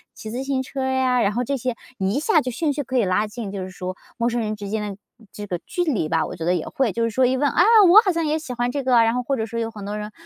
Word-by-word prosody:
骑 215 - -8
自 250 +3 -3
行 270 -1 -1
车 265 +1 -5
呀“， 260 -1 +2
然 200 -1 +1
后 245 +3 0
这 280 +3 -1
些 255 -2 -2 0.2
一 195 +7 0
下 315 0 +3
就 255 - -4
兴 290 +5 -1
趣 290 - -2
可 260 -1 -2
以 235 - +3
拉 190 +3 +1
近， 210 -2 -6
就 195 -1 -5
是 185 - -6
说 185 0 -6 0.2
陌 235 - +1
生 240 0 -1
人 215 -1 -2
之 205 -1 -7
间 215 +2 -2
的 205 -2 -5 0.4
这 210 - -7
个 180 -3 -3
距 355 - -1
离 265 - 0
吧， 160 -1 +1
我 - - -7
觉 165 - -6
得 180 +1 +2
也 165 - -3
会， 265 -5 0
就 230 +5 -1
是 230 - +1
说 260 +4 +3
一 260 +1 +1
问： 285 +2 +2
“啊， 345 - +3 0.3
我 410 +5 +9
好 380 - +3
像 335 -2 -1
也 305 +1 +1
喜 305 -5 -8
欢 245 0 -1
这 280 +1 -3
个”， 260 -1 +1
然 225 0 +2
后 250 - 0
或 275 +2 -1
者 220 -3 -2
说 230 +1 -5
有 225 0 -2
很 215 -3 -10
多 205 +1 -4
人 210 0 -6
235 Hz, 350 characters per minute, -22 LUFS, 210-265 Hz, 0.4 s, 我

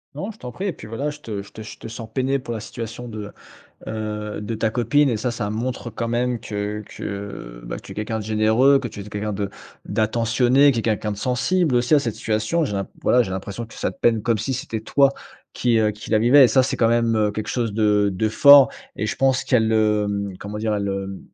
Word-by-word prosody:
Non, 200 +4 -4
je 220 - -18
t'en 125 - -7
prie 190 - -5
et 190 - -1
puis, 105 - -11
voilà, 140 +7 -3
je 150 - -11
te 105 -7 -5
je 100 - -16
te 110 - -10
je 110 - -9
te - - -9
sens 115 0 -8
peiné 135 +2 0
pour 125 - -7
la 110 - -4
situation 115 +2 -7
de, 105 -2 -7 0.6
heu, 105 -1 -4
de 105 +2 -4
ta 110 0 0
copine 125 +5 +2
et 115 - 0
ça, 120 +3 -1
ça 110 -3 -3
montre 120 +2 -3
quand 115 +1 -4
même 120 +1 0
que 105 0 -4
que, 100 -12 -7
bah, - - -5
que - - -11
tu - - -10
es - - -17
quelqu'un 110 +1 -3
de 105 - -5
généreux, 110 +6 +4
que 135 -3 -3
tu 105 -2 -10
es - - -5
quelqu'un 105 +1 -4
de 100 0 -3 0.4
d'attentionné, 120 +5 +3
qui 120 - -1
est - - -2
quelqu'un 110 -1 0
de 100 - -5
sensible 135 - +1
aussi 120 +5 +3
à - - +5
cette 115 -5 -2
situation. 110 +12 0
J'ai 105 - -4
l'in 100 -1 -2
voilà, 125 0 +4
j'ai 95 - -6
l'impression 95 +4 -5
que 115 - -16
ça - - -2
te - - -19
peine 115 -2 +3
comme 115 0 +1
si 130 +6 -2
c'était 115 -3 -4
toi 140 +4 +3 0.4
qui, 120 -2 +2
heu, 110 -1 +3
qui 105 +1 -8
la 110 - +4
vivais 130 +5 +7
et 125 - +7
ça, 130 - +4
c'est 130 - -1
quand 115 - +3
même, 115 -1 +2
heu, 105 -1 +2
quelque 105 +1 -5
chose 115 -4 -1
de 105 -2 +3
de 110 +4 0
fort 140 +3 +8 0.3
et 105 - -2
je 115 - -2
pense 135 -1 +2
qu'elle, 110 -3 +2
heu, 105 -1 +2 0.3
comment 105 +1 -6
dire, 110 -1 0
elle, 100 -1 -2
hem, 95 0 -4
110 Hz, 255 wpm, -22 LUFS, 105-125 Hz, 0.6 s, fort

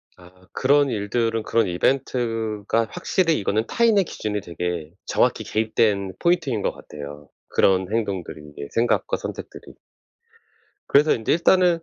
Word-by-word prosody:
아. 90 -1 -17 0.2
그런 140 +1 +3
일들은 115 +1 -1
그런 115 -1 +1
이벤트가 115 +1 0
확실히 165 - +1
이거는 110 +3 0
타인의 225 -5 +3
기준이 105 -8 -4
되게 85 -3 -4
정확히 - - +1
개입된 105 -3 0
포인트인 145 - +1
것 - - 0
같아요. 75 0 -10 0.2
그런 95 0 +2
행동들이 100 -8 -3
이게 70 -1 -8
생각과 120 +1 +1
선택들이. - - -8 1.1
그래서 150 +2 +5
인제 110 - 0
일단은 175 0 +4
110 Hz, 320 characters per minute, -23 LUFS, 95-135 Hz, 1.1 s, 그래서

